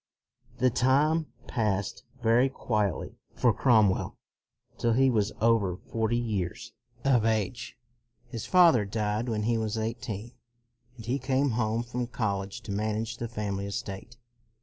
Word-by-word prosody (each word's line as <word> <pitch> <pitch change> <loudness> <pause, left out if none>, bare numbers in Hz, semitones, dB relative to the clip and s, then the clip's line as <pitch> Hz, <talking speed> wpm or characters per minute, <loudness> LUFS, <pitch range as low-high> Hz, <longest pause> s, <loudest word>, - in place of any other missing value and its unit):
The 130 0 +3
time 150 +6 +2 0.2
passed 100 -4 -1 0.2
very 120 +4 +4
quietly 105 -8 -2 0.2
for - - +3
Crom 110 -5 +5
well - - -4 0.6
till 115 -1 +2
he 130 +2 +4
was 105 -3 +1
over 110 -5 +2
forty 115 +3 -1
years 105 -7 -3 0.3
of 125 -5 +4
age, 110 +2 -1 0.5
His 115 -3 -6
father 170 - +6
died 105 +3 -2
when 105 -2 -1
he 115 +1 +1
was 110 0 -2
eighteen, 115 -1 -4 0.7
and 115 - -10
he 130 +4 -1
came 135 +1 +1
home 110 0 0
from 125 0 -3
college 100 -5 -3
to 105 - -7
manage 110 +3 -2
the 120 - -4
family 100 -3 -3
estate. 100 +3 -6
115 Hz, 140 wpm, -28 LUFS, 105-125 Hz, 0.7 s, father